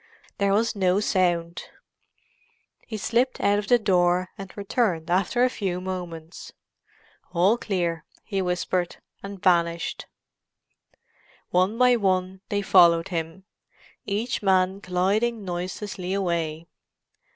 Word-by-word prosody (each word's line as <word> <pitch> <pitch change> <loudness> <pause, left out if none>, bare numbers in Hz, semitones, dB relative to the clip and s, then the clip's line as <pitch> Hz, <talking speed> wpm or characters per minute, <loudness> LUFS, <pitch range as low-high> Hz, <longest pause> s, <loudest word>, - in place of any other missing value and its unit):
There 200 -1 +2
was 225 +3 +1
no 190 -1 +2
sound. 175 -4 0 1.2
He 220 - -5
slipped 235 +5 0
out 205 0 +2
of 205 - -6
the 245 - +5
door, 180 -3 +2
and 195 -2 -9
returned 195 -5 -1
after 195 +7 +2
a 255 - +4
few 185 -6 -3
moments. 175 -3 -7 0.8
"All 180 +6 +4
clear," 175 -8 -2 0.2
he 195 -3 -2
whispered, 180 0 -1 0.2
and 200 0 -8
vanished. 170 -2 +1 1.4
One 185 +5 +2
by 250 0 +5
one 185 -2 0
they 205 0 -1
followed 170 -3 +5
him, 165 +1 -4 0.6
each 215 +4 -2
man 190 -1 +2
gliding 200 +4 0
noiselessly 185 +1 -4
away. 170 -4 -2
185 Hz, 115 wpm, -25 LUFS, 175-205 Hz, 1.4 s, the